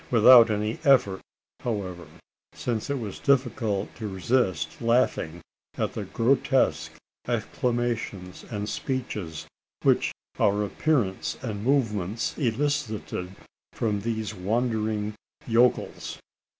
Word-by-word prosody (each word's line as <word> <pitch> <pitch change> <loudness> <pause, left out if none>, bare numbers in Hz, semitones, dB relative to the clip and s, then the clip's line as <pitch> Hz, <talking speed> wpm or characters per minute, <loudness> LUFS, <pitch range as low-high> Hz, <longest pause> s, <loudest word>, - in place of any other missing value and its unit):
Not 120 - +2
without 120 0 +9
an 105 +1 -1
effort, 125 -10 +4 0.4
however: 95 -7 -4 0.5
since 115 -1 -2
it 140 - 0
was 110 -6 -6
difficult 120 -7 +1
to 110 - -4
resist 95 -5 0
laughing 115 -8 +1 0.4
at - - -1
the - - -4
grotesque 130 +2 +1 0.3
exclamations 115 -7 -2
and 105 -2 -3
speeches, 105 - -4 0.4
which - - +3 0.3
our 105 +1 +3
appearance 115 -5 0
and 105 -4 -4
movements 115 -6 0
elicited 115 -8 -1 0.4
from 105 -3 -1
these 110 -1 -2
wondering 110 +1 -1 0.3
yokels. 120 +1 +1
110 Hz, 100 wpm, -26 LUFS, 100-125 Hz, 0.5 s, without